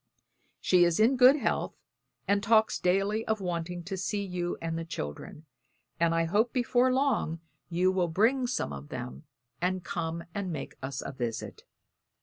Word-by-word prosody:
She 180 -1 +4
is 170 +1 +2
in 230 +5 +5
good 255 +2 +7
health 295 - -1 0.5
and 200 0 +2
talks 220 +1 +3
daily 195 +4 +1
of 220 -1 0
wanting 175 -1 -3
to 195 +3 -4
see 200 +2 -2
you 180 -2 -3
and 165 0 -3
the 165 - -3
children; 150 - -7 0.5
and 165 0 +3
I 165 - +2
hope 215 +8 +2
before 250 0 +2
long 255 - +1 0.3
you 180 +2 +2
will 185 -2 +1
bring 230 +10 +2
some 240 - -2
of 70 +1 -8
them, 65 +2 -7 0.4
and 185 0 0
come 170 -2 -3
and 200 -3 -3
make 155 -4 -5
us 135 0 -4
a - - -4
visit. 120 -4 -5
180 Hz, 165 wpm, -29 LUFS, 165-220 Hz, 0.5 s, good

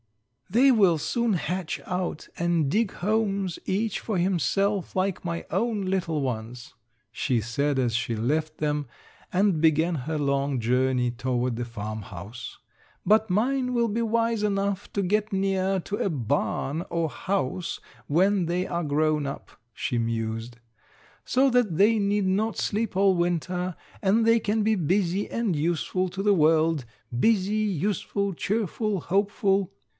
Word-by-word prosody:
"They 245 +8 +5
will 195 -8 +4
soon 235 - 0
hatch 180 -1 -2
out 180 -3 -3
and 170 -4 +1
dig 215 +5 +1
homes 200 -3 0
each 210 +2 -1
for 215 -4 -2
himself 190 +2 0
like 185 0 0
my 170 -1 -3
own 210 +1 0
little 175 -5 -1
ones," 120 -2 -5 0.4
she 120 +1 0
said 135 +6 -1
as 120 -3 +1
she 120 -1 -1
left 155 +7 -1
them 150 -2 -1 0.4
and 185 -4 +2
began 160 +2 +3
her 155 +3 -3
long 140 -2 0
journey 125 +1 +1
toward 125 0 -1
the 120 - -3
farmhouse. 110 -1 -7 0.5
"But 215 0 +4
mine 250 +6 +1
will 235 -1 +2
be 225 +2 -1
wise 230 -1 +1
enough 200 -1 -1
to 200 - 0
get 210 +3 0
near 195 0 +1
to 205 - -4
a - - 0
barn 145 - -1
or 170 -1 0
house 180 0 -2 0.3
when 185 +3 +2
they 180 +2 0
are 170 0 -2
grown 150 0 +1
up," 135 - -7 0.2
she 120 - -2
mused, 115 +1 -3 0.7
"so 270 +2 +3
that 235 -10 +2
they 215 +4 +5
need 200 0 +1
not 205 +3 0
sleep 210 -2 -1
all 195 -1 +4
winter, 175 +1 -1 0.3
and 220 +3 +3
they 230 0 +5
can 215 0 0
be 220 +1 +3
busy 185 +2 0
and 230 -7 -1
useful 175 +4 0
to 195 +2 -4
the 205 0 +4
world 160 -4 +3 0.3
busy, 210 - +2
useful, 200 0 -1
cheerful, 210 +2 -1
hopeful." 195 0 +1
180 Hz, 145 wpm, -26 LUFS, 145-205 Hz, 0.7 s, They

